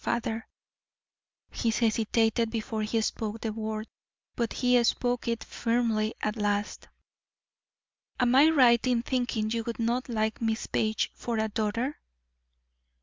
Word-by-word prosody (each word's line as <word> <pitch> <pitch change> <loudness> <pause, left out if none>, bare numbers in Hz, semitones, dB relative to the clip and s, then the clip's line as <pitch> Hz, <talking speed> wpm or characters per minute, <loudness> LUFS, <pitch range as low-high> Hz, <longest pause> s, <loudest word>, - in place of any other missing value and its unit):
Father" 230 0 -2 1.0
he 230 - -1
hesitated 225 0 +1
before 220 -1 -3
he 215 +2 0
spoke 220 0 -3
the 220 -2 -2
word, 215 0 -4 0.5
but 235 -2 -1
he 250 -1 +3
spoke 245 +1 0
it 230 -1 -1
firmly 230 -2 0
at 215 +1 0
last, 205 0 -1 1.3
"am 245 -1 +3
I 285 +4 +7
right 250 -7 +5
in 240 -2 +2
thinking 240 -4 -1
you 230 0 -1
would 235 - -4
not 240 +3 -1
like 220 -1 -1
Miss 225 -1 -1
Page 215 0 0
for 235 -2 -3
a 220 0 0
daughter?" 230 +6 -2
230 Hz, 135 wpm, -28 LUFS, 220-240 Hz, 1.3 s, I